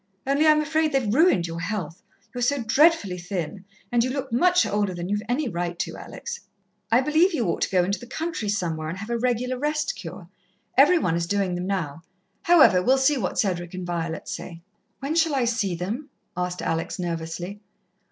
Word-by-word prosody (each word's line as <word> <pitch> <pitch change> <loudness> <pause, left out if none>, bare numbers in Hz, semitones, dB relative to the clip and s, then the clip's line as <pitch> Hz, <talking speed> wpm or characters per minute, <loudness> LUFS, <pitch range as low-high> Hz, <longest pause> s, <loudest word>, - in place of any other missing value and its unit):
Only 280 +3 +3
I'm 305 0 +6
afraid 310 +1 +1
they've 240 -6 +1
ruined 290 - +4
your 165 0 -5
health 170 -2 -4 0.3
you're 245 - -4
so 255 +1 +1
dreadfully 225 - +3
thin, 180 +1 -5 0.3
and 240 -1 +3
you 255 - -1
look 265 -1 -4
much 360 +8 +4
older 205 -3 0
than 175 +1 -5
you've 205 +1 0
any 265 +3 0
right 175 -3 -3
to, - - -3
Alex. - - -7 0.5
I 235 +3 +5
believe 315 +6 +3
you 245 - 0
ought 170 - -1
to - - +1
go 180 -1 +3
into 195 +3 -1
the 245 - -11
country 315 -6 -3
somewhere 165 -6 -2
and 170 - -5
have 215 +4 -6
a 235 - +1
regular 250 +1 0
rest 300 +1 -1
cure. 170 0 -9 0.5
Every 295 +7 +6
one 180 - +1
is 170 0 -1
doing 195 -1 0
them 180 +1 -3
now. 165 -6 -2 0.4
However, 340 - +6
we'll 260 +7 +4
see 265 +1 +3
what 185 - -2
Cedric 175 -3 -1
and 185 -1 -5
Violet 165 -2 -3
say." 170 -2 -7 0.4
"When 280 +3 -2
shall 325 -3 +2
I 260 -3 +2
see 225 -6 0
them?" 220 - -4 0.3
asked 180 0 -3
Alex 165 0 -2
nervously. 175 +3 -4
210 Hz, 200 wpm, -25 LUFS, 175-275 Hz, 0.5 s, I'm